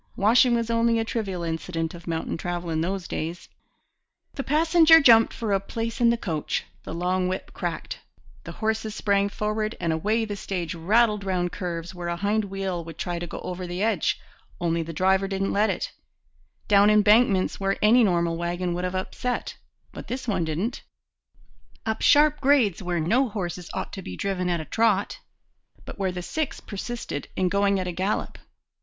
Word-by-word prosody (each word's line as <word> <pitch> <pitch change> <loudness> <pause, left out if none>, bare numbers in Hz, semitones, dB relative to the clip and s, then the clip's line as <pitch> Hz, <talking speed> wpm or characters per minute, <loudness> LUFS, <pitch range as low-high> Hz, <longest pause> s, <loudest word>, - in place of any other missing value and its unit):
Washing 235 +4 +4
was 230 0 -1
only 230 0 +2
a 225 - 0
trivial 195 -6 -3
incident 165 0 -3
of 175 0 -12
mountain 165 -1 -2
travel 175 0 -4
in 160 0 0
those 185 +1 -2
days. 170 +2 -5 0.8
The - - -3
passenger 325 +2 +6
jumped 230 -5 +6
for 220 -3 -2
a 195 - +3
place 230 +5 -4
in 235 - +6
the 235 - +2
coach; 160 -9 -2 0.2
the - - -8
long 180 +1 0
whip 185 +1 -4
cracked. - - -4 0.4
The - - -8
horses 220 -1 -2
sprang 200 -1 +1
forward; 215 +1 -2
and 165 -1 0
away 215 +8 0
the 205 -1 -4
stage 180 -4 -4
rattled 210 +5 +2
round 180 -2 -1
curves 175 -1 -5
where 175 -1 -6
a 170 - -1
hind 205 +4 0
wheel 190 -3 -3
would 165 -1 -10
try 175 -1 -3
to 175 - -5
go - - -7
over 180 0 -5
the 175 +3 -3
edge 215 -7 +1 0.4
only 170 -1 0
the 165 0 -5
driver 190 +4 +2
didn't 195 0 -1
let 210 +2 +3
it; - - -2 0.8
down 205 0 +6
embankments 210 -1 +4
where 195 0 0
any 235 +3 +6
normal 170 -4 +1
wagon 175 +1 -2
would 175 +1 -3
have 180 +1 -2
upset, 245 +6 -3 0.4
but - - -9
this 255 0 -5
one 190 -6 0
didn't; 165 +9 -2 1.0
up 220 0 -2
sharp 300 0 +5
grades 260 - +3
where 175 -2 -1
no 230 +11 +2
horses 180 -4 -5
ought - - -4
to 195 - -6
be 90 - -8
driven 185 -2 -1
at 170 -1 0
a 155 - -6
trot, 215 -1 +1 0.7
but - - -9
where 190 -2 0
the 180 0 -5
six 310 - -3
persisted 210 -6 -5
in 185 -1 +1
going 200 +1 +2
at 185 - -2
a - - -1
gallop! 190 +4 -2
195 Hz, 185 wpm, -25 LUFS, 175-220 Hz, 1.0 s, passenger